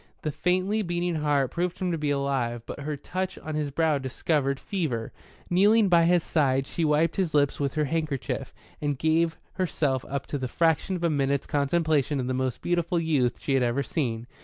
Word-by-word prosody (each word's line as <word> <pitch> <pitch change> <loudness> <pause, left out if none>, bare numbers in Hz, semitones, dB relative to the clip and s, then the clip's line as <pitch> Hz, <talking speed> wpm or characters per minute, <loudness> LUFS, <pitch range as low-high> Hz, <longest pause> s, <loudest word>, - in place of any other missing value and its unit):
The 155 - -1
faintly 185 +7 +1
beating 175 -2 -1
heart 145 -4 +1
proved 180 +1 -2
him 185 -2 -1
to 165 - -1
be 150 -1 -1
alive, 135 -5 -1
but - - -7
her 145 +1 -3
touch 185 +6 -4
on 155 - -6
his 150 -1 -1
brow 155 0 +1
discovered 135 +1 -1
fever. 150 - -2 0.4
Kneeling 205 +3 +4
by 170 -2 +5
his 175 -1 +3
side, 135 -4 +1
she 165 - -3
wiped 155 +1 +2
his 180 -6 0
lips 145 -1 +2
with 140 0 -1
her 155 -1 +1
handkerchief, 150 -5 -2 0.3
and 145 -2 -1
gave 160 +2 +2 0.2
herself 145 -8 0
up 140 0 -3
to 145 - -4
the 130 - -2
fraction 165 +6 +1
of 175 - -5
a 170 - +3
minute's 140 -1 0
contemplation 150 -1 +1
of 125 - -1
the 130 - -1
most 130 -1 -2
beautiful 175 0 +1
youth 145 -7 +1
she 140 - -1
had 135 - +3
ever 125 +3 +1
seen. 120 -5 -2
150 Hz, 200 wpm, -27 LUFS, 135-170 Hz, 0.4 s, by